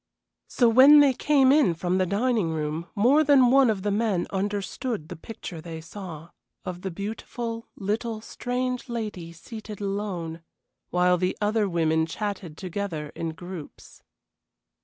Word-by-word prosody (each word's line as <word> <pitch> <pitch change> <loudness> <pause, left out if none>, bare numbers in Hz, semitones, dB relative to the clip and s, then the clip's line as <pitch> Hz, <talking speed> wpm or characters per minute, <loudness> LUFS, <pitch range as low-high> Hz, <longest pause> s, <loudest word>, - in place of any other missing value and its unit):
So 240 - +3
when 265 +6 +8
they 280 -2 +6
came 270 0 +4
in 275 - +4
from 180 +3 0
the 185 - +2
dining 215 -1 +1
room 155 +1 -3
more 260 +9 +5
than 270 -4 +5
one 270 -2 +6
of 200 -4 -1
the 205 - 0
men 205 -4 +1
understood 205 - -3
the 180 - -6
picture 170 -2 -8
they 165 -1 -7
saw, 170 -1 -9 0.3
of 180 -1 -5
the 190 - -3
beautiful, 225 +4 -5
little, 220 +3 -2
strange 250 +2 -3
lady 210 -8 -4
seated 210 +4 -9
alone, 195 -5 -3 0.5
while 180 0 +3
the 185 +1 -1
other 210 -1 +1
women 160 -2 +1
chatted 185 -4 -5
together 180 -5 -4
in 165 -1 -4
groups. 175 -2 -10
200 Hz, 145 wpm, -26 LUFS, 170-230 Hz, 0.5 s, when